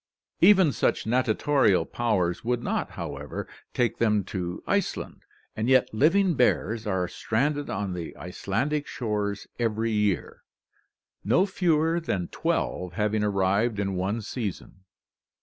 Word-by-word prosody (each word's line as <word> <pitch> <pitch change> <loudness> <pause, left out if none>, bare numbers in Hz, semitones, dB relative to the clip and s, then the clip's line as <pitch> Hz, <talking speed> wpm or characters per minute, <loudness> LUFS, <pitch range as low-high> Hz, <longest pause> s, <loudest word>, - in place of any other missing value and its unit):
Even 185 -3 +6
such 110 - 0
natatorial 125 -1 +2
powers 95 -8 0
would 120 0 -1
not, - - -1
however, 75 -4 -6 0.2
take 120 -2 0
them 105 -3 +2
to 90 -3 -5
Iceland, - - -2 0.3
and 110 +3 -1
yet 130 -3 +4
living 170 - +3
bears 115 -4 +1
are 95 -3 0
stranded 145 +10 -1
on 100 -1 -2
the 85 -2 -6
Icelandic 130 +11 -2
shores 105 -4 -2
every 115 -1 0
year, 105 -3 0 0.8
no 165 - +3
fewer 165 -4 +1
than 95 - -2
twelve 90 -1 -2
having 105 +2 0
arrived 100 +3 +1
in 100 -1 -1
one 100 +5 -2
season. 100 -4 -6
110 Hz, 125 wpm, -26 LUFS, 95-130 Hz, 0.8 s, Even